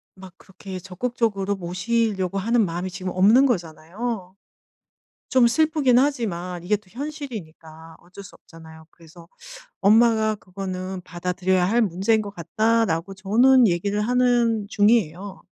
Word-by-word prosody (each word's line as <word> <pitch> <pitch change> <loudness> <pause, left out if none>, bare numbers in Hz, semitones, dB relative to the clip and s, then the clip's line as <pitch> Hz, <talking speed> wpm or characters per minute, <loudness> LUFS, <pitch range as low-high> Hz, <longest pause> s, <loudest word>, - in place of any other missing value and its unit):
막 190 -1 -13
그렇게 190 0 -10
적극적으로 200 +1 -2
모시려고 190 +1 -2
하는 230 +3 +2
마음이 175 +1 -4
지금 185 +1 -5
없는 215 +9 +5
거잖아요. 185 - -4 1.0
좀 255 -3 +5
슬프긴 300 -2 +2
하지만 185 -11 -2
이게 210 +4 +1
또 210 - -20
현실이니까 180 - -9
어쩔 185 +3 -13
수 - - -14
없잖아요. 160 -1 -15
그래서 165 +1 -17 0.5
"엄마가 220 +1 +4
그거는 185 -1 -6
받아들여야 180 +1 -1
할 235 +3 +2
문제인 205 +2 +1
것 205 -1 -7
같다."라고 195 0 0
저는 235 +6 +4
얘기를 200 +4 -1
하는 240 -2 +1
중이에요. 205 -3 0
195 Hz, 315 characters per minute, -23 LUFS, 180-230 Hz, 1.0 s, 없는